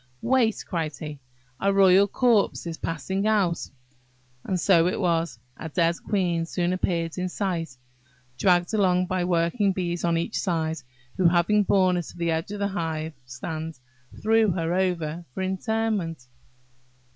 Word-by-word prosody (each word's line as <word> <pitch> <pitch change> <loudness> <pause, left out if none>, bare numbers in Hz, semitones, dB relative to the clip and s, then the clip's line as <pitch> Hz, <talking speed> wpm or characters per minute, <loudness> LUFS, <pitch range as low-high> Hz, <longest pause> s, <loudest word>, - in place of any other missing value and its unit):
"Wait," 240 -4 +2
cried 165 -5 -2
he; 150 -2 -7 0.4
"a 200 - +2
royal 195 0 +6
corpse 230 -3 +2
is 165 -1 -5
passing 190 +5 -2
out!" 200 -6 +1 0.7
And 185 -2 -1
so 170 -2 +4
it 180 - -1
was;–a 165 -5 -2
dead 170 +1 +1
queen 175 -5 0
soon 175 +1 -1
appeared 170 -2 -1
in 180 0 -1
sight, 170 -8 -3 0.6
dragged 175 0 +3
along 185 -3 +3
by 185 -1 -1
working 180 +4 +1
bees 175 -2 -2
on 170 -1 +2
each 170 +6 -2
side; 160 -4 -1 0.4
who, 185 - +4
having 175 +5 +3
borne 185 -2 +3
her - - 0
to 175 - -11
the 170 -1 0
edge 160 +2 -2
of 205 - -5
the 200 0 -1
hive 160 -4 -3
stand, 155 +5 -6 0.5
threw 220 0 +4
her 170 -2 -1
over 175 -3 -1
for 190 - -2
interment. 190 - -2
180 Hz, 150 wpm, -25 LUFS, 165-195 Hz, 0.7 s, royal